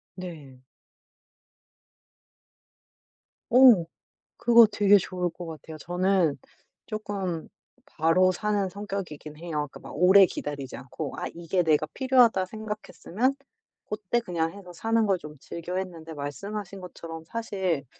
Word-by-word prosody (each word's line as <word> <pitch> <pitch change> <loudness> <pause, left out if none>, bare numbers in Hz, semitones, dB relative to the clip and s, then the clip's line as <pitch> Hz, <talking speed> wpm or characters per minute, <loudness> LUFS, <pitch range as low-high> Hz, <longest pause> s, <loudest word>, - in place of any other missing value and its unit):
네. 160 -8 -9 2.9
어. 245 -7 +8 0.5
그거 235 -1 +7
되게 205 -1 +5
좋을 180 -2 -2
것 175 +1 -9
같아요. 160 -1 -9
저는 180 -1 +1 0.5
쪼끔 200 -6 -4 0.4
바로 185 - +3
사는 205 +1 0
성격이긴 185 -7 -6
해요. 170 +2 -8 0.2
그러니까 - - -11
막 - - -11
오래 190 +5 +7
기다리지 145 -6 -5
않고 135 +3 -6
'아 - - -3
이게 175 +2 0
내가 155 -2 +3
필요하다.' 250 -7 +4
생각했으면 215 +3 -3 0.5
고때 210 +2 -1
그냥 170 -7 -2
해서 190 -3 -11
사는 225 +4 +1
걸 195 -2 +2
좀 150 -3 -11
즐겨했는데 170 0 -5
말씀하신 195 +7 -6
것처럼 165 -2 -8
사실 190 -8 -2
185 Hz, 255 characters per minute, -27 LUFS, 165-205 Hz, 2.9 s, 어